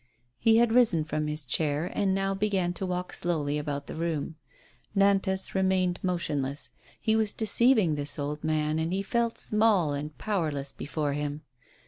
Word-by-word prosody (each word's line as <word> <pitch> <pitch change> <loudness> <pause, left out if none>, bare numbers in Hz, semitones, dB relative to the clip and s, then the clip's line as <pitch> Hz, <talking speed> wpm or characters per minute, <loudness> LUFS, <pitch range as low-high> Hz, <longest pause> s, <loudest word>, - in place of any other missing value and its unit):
He 225 0 +4
had 235 -1 +4
risen 225 -10 +5
from 155 0 -2
his 150 -1 -4
chair, 145 +4 0
and 195 -2 +1
now 195 0 0
began 195 -3 0
to 190 +1 -4
walk 180 0 -3
slowly 150 -4 0
about 145 -1 -4
the - - -7
room. 160 -2 -2 0.6
Nantas 195 -1 +2
remained 190 -2 +1
motionless. 145 -7 -2 0.3
He 220 - +1
was 220 -2 +1
deceiving 220 -5 +3
this 145 -1 -1
old 150 +1 -4
man, 155 0 0
and 160 +1 -1
he 195 +1 -1
felt 235 +2 0
small 210 -8 +2
and 145 +1 -5
powerless 155 -10 -2
before 150 -1 -3
him. 145 +1 -4
170 Hz, 160 wpm, -28 LUFS, 150-195 Hz, 0.6 s, risen